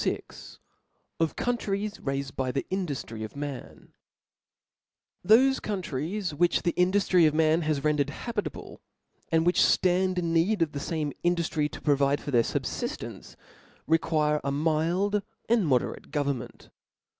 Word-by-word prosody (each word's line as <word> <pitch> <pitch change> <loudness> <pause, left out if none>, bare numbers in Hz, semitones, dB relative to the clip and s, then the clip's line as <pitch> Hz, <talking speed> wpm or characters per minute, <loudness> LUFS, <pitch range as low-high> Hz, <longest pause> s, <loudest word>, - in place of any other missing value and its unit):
VL - - -5 0.6
Of 165 -1 0
Countries 210 -4 -2
raifed 135 -1 -3
by 130 -1 -1
the 135 - -2
Indujiry 145 - -3
of 110 - -8
Man* 140 -2 -7 1.3
'1 215 +5 +7
''HOSE 265 +1 +3
countries 185 -1 -3
which 175 +4 +2
the 170 - +1
induffry 180 -2 +3
of 155 - 0
man 160 +1 +3
has 155 -3 -1
rendered 150 -2 +2
habitable^ 215 +7 -5 0.5
and 160 0 +3
which 175 - +3
ftarid 185 0 +3
in 170 -2 0
need 170 +3 +3
of 155 - -3
the 145 - -4
faai^ 150 -1 -2
induftry. 170 -3 +1
to - - -10
provide 140 -1 +2
for 145 - -6
their 120 -3 +5
fub* - - -1
fiftcnce, - - -5 0.5
require 155 -2 +1
a 140 - -1
mild 165 +7 +1 0.3
and 225 -6 +3
moderate 125 -4 0
governn^nt. 140 -4 -3
160 Hz, 145 wpm, -27 LUFS, 145-185 Hz, 1.3 s, 1